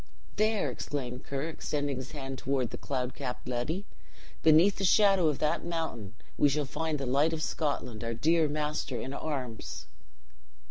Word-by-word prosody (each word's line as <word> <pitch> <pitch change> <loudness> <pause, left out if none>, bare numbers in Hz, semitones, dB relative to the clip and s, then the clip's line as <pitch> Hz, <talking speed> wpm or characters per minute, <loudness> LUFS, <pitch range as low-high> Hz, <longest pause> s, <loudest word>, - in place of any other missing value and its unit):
"There," 215 -9 +2
exclaimed 125 +1 -4
Ker, 140 0 -2
extending 145 -4 -2
his 130 +1 -5
hand 135 -2 -5
toward 130 -3 0
the - - -5
cloud 130 -2 -2
capped 125 - -5
Ledi, 135 +11 -2 0.6
"beneath 160 +5 +6
the 200 - -2
shadow 195 -2 +5
of 150 -3 +1
that 150 - +1
mountain, 160 - -3 0.2
we 145 - +6
shall 145 +1 0
find 160 +2 -2
the 135 - -3
light 140 +6 +3
of 155 -1 -2
Scotland, 125 -9 -2
our 115 0 -2
dear 160 +6 +3
master 150 -4 -2
in 135 - -4
arms!" 130 -7 -4
145 Hz, 165 wpm, -30 LUFS, 130-160 Hz, 0.6 s, beneath